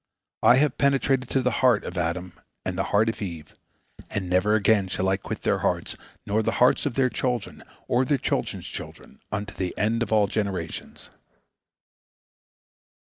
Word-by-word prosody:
I 120 - +7
have 140 0 +2
penetrated 135 -2 +2
to 135 - +1
the 125 - +2
heart 125 -5 +4
of 90 - -6
Adam 90 +1 -2 0.3
and 95 - -2
the 95 - -1
heart 105 +2 +3
of 115 -1 -2
Eve, 85 -6 -6 0.5
and 100 -3 -3
never 95 +4 +3
again 105 -2 +3
shall 95 0 -1
I 95 - +3
quit - - -6
their - - +1
hearts, - - -1 0.3
nor 105 +2 +1
the - - 0
hearts 125 +3 +4
of 125 - -4
their 135 -1 +3
children, 125 -4 -2 0.3
or 125 +2 +2
their 140 +2 +1
children's - - -2
children, - - -9
unto 105 -1 -3
the 90 -2 -4
end 110 +4 +1
of 115 - -1
all 105 -2 +4
generations." 100 -5 -4
105 Hz, 170 wpm, -25 LUFS, 95-125 Hz, 0.5 s, I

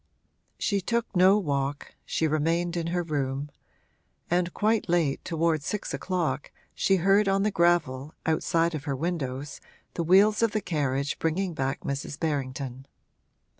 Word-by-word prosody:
She 200 -2 0
took 235 +2 -2
no 185 +3 +6
walk, 140 -6 -2
she 160 - 0
remained 165 +3 0
in 170 -1 -2
her 175 +1 0
room, 145 -2 -2 0.8
and 175 0 +2
quite 215 0 +1
late, 165 -5 +1
towards 165 -3 0
six 210 - -3
o'clock, 160 -7 -2 0.2
she 195 - +2
heard 195 +3 +3
on 195 0 +2
the 210 - +1
gravel, 170 -6 +1
outside 165 +1 +1
of 150 -2 -5
her 140 -3 -1
windows, 140 -3 -3 0.3
the - - -2
wheels 200 +6 +5
of 230 -2 +2
the 215 - +1
carriage 140 -5 -1
bringing 175 +3 0
back 135 -2 -2
Mrs. 140 +1 -4
Berrington. 135 -3 -3
165 Hz, 145 wpm, -27 LUFS, 140-185 Hz, 0.8 s, no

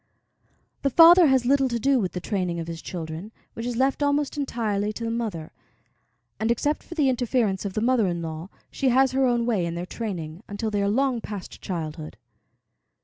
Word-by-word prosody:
The 275 - +1
father 335 +4 +8
has 265 -3 +3
little 270 0 +3
to 235 - -1
do 270 +3 +2
with 185 -6 -2
the 180 - -3
training 180 -3 -2
of 165 - -4
his 165 0 -7
children, 165 +3 -6 0.2
which 230 +1 -5
is 245 - -2
left 265 +4 +1
almost 285 0 +1
entirely 215 -7 -1
to 230 - -6
the 230 - -2
mother, 215 -9 -4 0.9
and, 220 - 0
except 290 +6 0
for 340 - -10
the 295 -4 +2
interference 240 -6 0
of 195 - -3
the 215 - -1
mother 235 -3 +3
in 175 -1 -2
law, 160 +2 -6 0.2
she 270 - 0
has 265 +1 +4
her 265 0 +2
own 240 -1 +1
way 220 -7 +1
in 170 0 -3
their 175 +1 -4
training, 180 -6 -5
until 210 +2 -3
they 205 -1 0
are 200 - +1
long 255 +1 +1
past 205 -4 -8
childhood. 155 -3 -5
225 Hz, 205 wpm, -25 LUFS, 180-260 Hz, 0.9 s, father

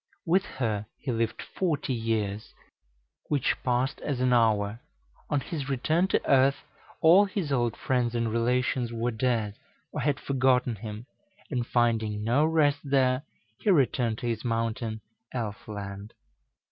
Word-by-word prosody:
With 185 +3 +3
her 110 -5 -2
he 130 - -4
lived 115 -1 -1
forty 150 -7 -1
years, 110 -3 -2 0.7
which 145 -4 +1
passed 125 +2 0
as 140 -4 -2
an 125 0 +3
hour; 110 -2 +2 0.5
on 145 -2 +1
his 140 -2 -5
return 155 +7 +1
to - - 0
earth 135 0 +4 0.4
all 180 +6 +7
his 185 -6 -3
old 120 -4 +1
friends 125 -2 0
and 115 -1 0
relations 125 +1 +1
were 115 +1 -1
dead, 110 -3 -1 0.3
or - - -3
had 145 -2 +1
forgotten 130 -3 +2
him, 105 +2 -7 0.5
and 120 -3 -1
finding 110 -3 +1
no 120 +7 +3
rest 150 -3 +3
there, 135 -2 +2 0.4
he - - 0
returned 130 - +2
to 120 - -6
his 115 -2 -2
mountain 115 -1 -2 0.3
elf 110 -4 -4
land. 100 0 -7
120 Hz, 145 wpm, -28 LUFS, 115-140 Hz, 0.7 s, all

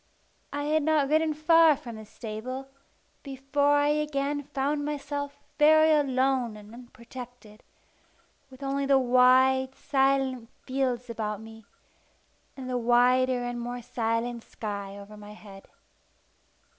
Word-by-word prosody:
I 290 0 -3
had 310 +1 +1
not 300 -2 +1
ridden 310 0 +2
far 315 0 +5
from 235 -3 -9
the 220 0 -10
stable, 245 +6 -7 0.5
before 280 +1 0
I 290 0 +3
again 295 -1 -1
found 290 +1 -2
myself 285 -1 -4 0.2
very 310 +1 +6
much 295 -1 +3
alone 255 -3 0
and 210 +1 -14
unprotected, 240 -2 -12 0.9
with 260 +1 -13
only 275 0 -1
the 275 -1 +5
wide, 260 +1 +4
silent 270 -3 0 0.2
fields 255 -2 -2
about 215 -3 -4
me, 220 0 -13 0.9
and 260 -1 -7
the 250 -1 -1
wider 245 +1 +3
and 245 0 -4
more 245 0 -5
silent 230 0 -2
sky 200 -2 -6
over 200 +1 -11
my 210 0 -11
head. 200 -2 -14
260 Hz, 130 wpm, -27 LUFS, 235-285 Hz, 0.9 s, very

